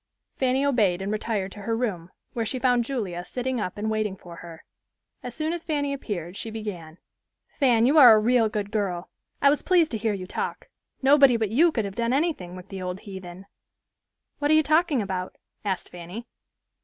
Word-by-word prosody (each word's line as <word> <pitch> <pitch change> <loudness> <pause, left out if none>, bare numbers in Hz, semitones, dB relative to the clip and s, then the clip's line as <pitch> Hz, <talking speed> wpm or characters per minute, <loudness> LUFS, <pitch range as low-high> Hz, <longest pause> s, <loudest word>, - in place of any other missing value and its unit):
Fanny 260 +1 +1
obeyed 210 -10 +2
and 195 +1 -3
retired 215 -3 -2
to 205 - -10
her 225 +2 -1
room, 190 -8 -3 0.2
where 230 - -1
she 240 +4 -2
found 245 -2 +2
Julia 200 -10 -3
sitting 250 +5 -3
up 195 +1 -4
and 210 +1 -3
waiting 215 -2 -1
for 175 -2 -12
her. 165 -1 -11 0.6
As 245 -1 -7
soon 315 +1 -1
as 345 -1 -5
Fanny 285 -3 -1
appeared 185 - -5
she 225 - -5
began, 190 -8 -7 0.6
"Fan, 240 -5 +4
you 295 +5 +5
are 245 -5 +10
a - - +4
real 230 0 +3
good 205 -1 -4
girl. 190 -5 -2 0.3
I 280 - +7
was 295 - 0
pleased 350 -4 +3
to 225 - -2
hear 220 0 0
you 190 -2 -5
talk. - - -5 0.3
Nobody 275 -3 +6
but 220 -3 -1
you 325 +9 +4
could 225 -8 -1
have 195 - -5
done 235 +3 -1
anything 275 - -1
with 185 +1 -11
the 195 -1 -6
old 180 +1 -5
heathen." 190 -2 -9 0.9
"What 290 0 0
are 310 - +6
you 310 - +5
talking 310 -5 +2
about?" 185 -1 -4 0.3
asked 195 -3 -3
Fanny. 180 +6 -8
220 Hz, 200 wpm, -25 LUFS, 190-260 Hz, 0.9 s, are